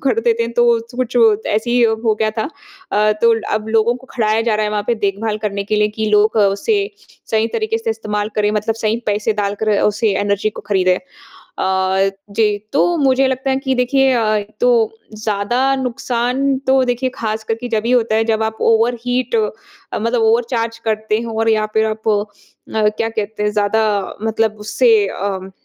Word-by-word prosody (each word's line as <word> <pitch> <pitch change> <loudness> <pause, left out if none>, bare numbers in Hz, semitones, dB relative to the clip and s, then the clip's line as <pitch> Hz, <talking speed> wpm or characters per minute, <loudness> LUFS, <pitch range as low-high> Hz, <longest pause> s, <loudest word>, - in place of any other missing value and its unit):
कर 430 +12 +2
देते 460 - +1
हैं 230 0 -4
तो 240 0 +3 0.3
कुछ 250 -1 -2
वो 225 -3 +6
ऐसे 220 +3 -1
ही 245 0 +3 0.2
हो 220 - +3
गया 215 0 +2
था 220 - -1 0.4
अ, 210 +1 +3
तो 230 -1 +6 0.2
अब 215 0 -3
लोगों 225 +1 +2
को 260 +1 -16
खड़ाया 220 -2 +1
जा 225 -2 +1
रहा 215 - 0
है 210 - -1
वहाँ 210 -1 -1
पे 240 - +2
देखभाल 210 +2 -1
करने 200 -2 -3
के 215 +2 -1
लिए 210 0 +3
कि 220 0 -1
लोग 210 +1 +3
उसे 205 - +2 0.5
सही 220 0 +2
तरीके 445 - -1
से 455 0 -2
इस्तेमाल 210 - -3
करें 210 0 +2
मतलब 215 +1 -1
सही 225 0 -1
पैसे 210 +2 0
डालकर 205 0 0
उसे 210 +1 +1
एनर्जी 205 +1 0
को - - -9
खरीदें। 185 -3 +2 0.4
अ, 190 +1 0 0.3
जी 220 -2 +5 0.2
तो 280 - +3
मुझे 270 -1 +3
लगता 260 +1 -1
है 265 - +1
कि 265 -1 +1
देखिए 265 +1 +2
अ, 235 -2 +1
एक 205 0 -3
तो - - +4 0.5
ज़्यादा 240 +6 +1
नुकसान 255 +1 -1
तो 265 0 +4
देखिए 250 +1 -1
ख़ासकर 220 0 -2
के 245 +2 -7
जभी 225 +1 -1
होता 235 -3 +2
है 225 - +2
जब 220 -1 0
आप 220 0 -2 0.2
ओवरहीट 245 - 0
अ, 435 -1 +1 0.5
मतलब 230 +1 0
ओवरचार्ज 230 0 +1
करते 215 0 0
हों 225 -1 -5
और 225 - +1
या 215 -1 +2
फिर 220 0 +3
आप 220 0 -3
अ, 205 -1 +2 0.7
क्या 225 - 0
कहते 220 -1 -4
हैं 210 - +1
ज़्यादा 210 +1 +1 0.4
मतलब 220 -1 0
उससे 230 +3 +2 0.2
अम, 190 -1 -4
220 Hz, 190 wpm, -18 LUFS, 210-245 Hz, 0.7 s, वो